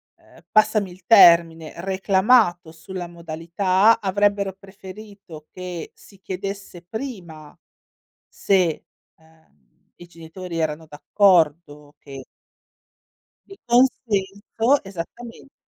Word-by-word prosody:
ehm, - - -22
passami 215 -3 +2
il 180 0 -17
termine, 170 -6 +5
reclamato 190 -1 +1
sulla 180 +1 -8
modalità, 175 +6 0
avrebbero 200 0 0
preferito 195 -4 -13
che 180 -2 -8
si 195 -2 -20
chiedesse 195 -1 -7
prima, 180 - -9 0.7
se, 180 -5 -1 0.3
uhm, 160 - -30
i 175 - -14
genitori 170 +1 -9
erano 160 0 -3
d'accordo, 150 -3 0
che 135 -1 -11 1.2
Di 390 - -14
consenso, 230 0 0
esattamente. 220 +8 -10
185 Hz, 90 wpm, -21 LUFS, 165-205 Hz, 1.2 s, termine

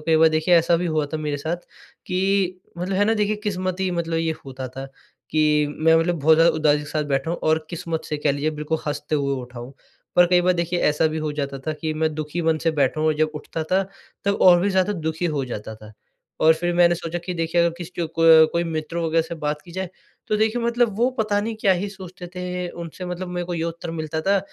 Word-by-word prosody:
कई 160 -1 +4
बार 160 0 +6
देखिए, 155 +3 +2
ऐसा 170 +1 +4
भी 175 +1 -1
हुआ 155 -2 0
था - - 0
मेरे 150 -1 -2
साथ 160 +4 -2 0.5
कि 190 -1 +1 0.2
मतलब 185 +2 -2
है 205 - +4
ना, 225 +1 +2
देखिए 210 0 0
किस्मत 185 -2 -2
ही 190 -1 0
मतलब 165 -1 -2
ये 165 -1 0
होता 130 -1 -6
था 135 0 -5 0.4
कि 150 -1 +3
मैं 160 +1 +5
मतलब 170 0 +1
बहुत 160 +2 +6
ज़्यादा 165 +1 +5
उदासी 150 -1 +3
के 150 - -6
साथ 150 -1 -1
बैठा 135 +5 -1
हूँ 170 - -2
और 155 0 +2
किस्मत 165 -1 -4
से 150 - -3
कह 145 - +1
लीजिए, 145 +2 -1
बिल्कुल 155 +1 -2
हँसते 150 +1 -2
हुए 140 -1 0
उठा 125 0 -10
हूँ। 125 +3 -9 0.4
पर 175 0 +7
कई 180 0 +4
बार 180 +1 +3
देखिए, 175 0 -1
ऐसा 150 +2 +3
भी 155 0 -2
हो 155 -1 -2
जाता 140 -2 -3
था 155 - 0
कि 155 -1 -2
मैं 155 0 0
दुखी 155 +2 -3
मन 160 -1 +2
से - - +5
बैठा 135 +3 +2
हूँ 155 - +2
और 155 - +2
जब 155 0 +2
उठता 160 +1 -5
था, 190 +4 +2 0.4
तब 200 0 +1
और 175 -1 +7
भी 200 - +2
ज़्यादा 190 +2 +2
दुखी 160 -1 -3
हो 135 - 0
जाता 110 -3 -6
था 110 0 -13 0.5
और 160 +1 +6
फिर 175 +2 -1
मैंने 175 0 +5
सोचा 170 0 -4
कि 175 +1 -5
देखिए, 165 +1 +1
अगर 170 - +3
किसी 175 0 -7
और - - -1
को 160 -1 +8
कोई 170 0 +1
मित्र 160 0 -4
वग़ैरह 165 -1 +1
से 170 - -7
बात 150 -1 -3
की 170 - -13
जाए, 190 0 -3 0.4
तो 215 - +2
देखिए, 220 +3 +1
मतलब 235 -3 +1
वो 245 - +4
पता 210 -2 +1
नहीं 225 +1 -3
क्या 195 - +4
ही 185 +3 -2
सोचते 185 -2 -10
थे, 180 0 -4
उनसे 170 +2 -8
मतलब 180 +1 -5
मेरे 175 0 -3
को 175 - -3
ये 165 - -2
उत्तर 170 0 -5
मिलता 160 -1 -3
था 195 +4 +2
165 Hz, 250 wpm, -23 LUFS, 155-180 Hz, 0.5 s, को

